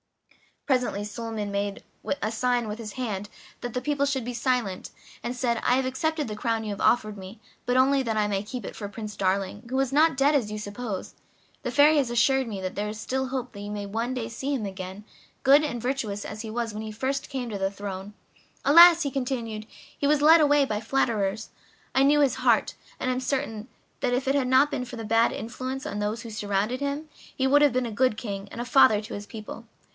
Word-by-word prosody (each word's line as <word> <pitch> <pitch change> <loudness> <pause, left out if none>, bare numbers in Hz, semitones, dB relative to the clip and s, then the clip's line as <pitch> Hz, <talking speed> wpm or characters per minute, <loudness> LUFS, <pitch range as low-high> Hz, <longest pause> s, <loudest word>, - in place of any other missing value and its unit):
Presently 250 -7 0
Suliman 210 -1 -4
made 200 0 -2 0.4
a 215 - 0
sign 245 0 0
with 210 +2 -5
his 215 -3 -6
hand 205 -5 -4 0.3
that 245 -2 -5
the 250 - 0
people 285 -1 0
should 265 -4 -1
be 245 - -4
silent, 235 -6 -1 0.3
and 245 - -4
said: 240 -2 0
"I 250 - +4
have 265 0 +1
accepted 300 +3 -1
the 210 - -4
crown 225 +1 -1
you 215 - -4
have 200 - -5
offered 215 -3 +2
me, 195 +3 -10 0.3
but 245 +1 +2
only 270 +1 +4
that 230 -4 -1
I 210 -1 +2
may 200 -1 -1
keep 225 +1 -6
it - - -7
for 205 - -5
Prince 210 0 -7
Darling, 195 +3 -1
who 260 +1 0
is 270 -1 +1
not 315 +2 +4
dead 280 +2 +4
as 250 -8 +1
you 215 - -4
suppose; 210 -1 -5 0.5
the - - -3
Fairy 300 +2 +6
has 270 -4 +2
assured 260 +2 +2
me 205 -4 -5
that 185 0 -3
there 205 +1 -2
is 210 +1 -6
still 265 +4 -2
hope 255 -1 -4
that 200 - -10
you 205 0 -6
may 205 -1 -5
some 230 +4 -1
day 235 -3 -3
see 270 +5 -2
him 225 -6 -3
again, 190 +1 -7 0.4
good 280 +3 +6
and 240 -6 -2
virtuous 235 -5 -2
as 215 0 -6
he 220 - -6
was 230 0 -3
when 215 - -5
he 220 0 -6
first 265 +6 -2
came 260 -4 -4
to 205 -3 -4
the 195 0 +1
throne. 200 0 -7 0.5
Alas!" 340 +3 +9
he 280 - -2
continued, 235 -5 -3 0.3
"he 285 - -1
was 295 0 +3
led 320 +2 +7
away 290 -1 +4
by 210 -5 -2
flatterers. 220 -3 0 0.4
I 265 - +3
knew 295 +2 +5
his 270 -3 +3
heart, 245 -4 +2 0.3
and 255 - 0
am 255 - -1
certain 255 -5 -2 0.3
that 245 - 0
if 260 +2 -1
it 270 - +2
had 270 -3 +1
not 265 +4 +4
been 260 -3 -2
for 245 - -8
the 225 - -6
bad 225 +2 +3
influence 255 +4 -5
of 205 - -4
those 210 +3 -2
who 230 - -8
surrounded 210 +3 -1
him 285 +2 -3
he 265 - -5
would 290 +2 +5
have 290 -4 +5
been 255 0 +1
a 230 - -4
good 235 0 +2
king 200 -3 -5
and - - -8
a - - -4
father 240 -4 +5
to 220 +3 -8
his 205 0 -6
people. 215 -2 -8
235 Hz, 235 wpm, -26 LUFS, 210-265 Hz, 0.5 s, Alas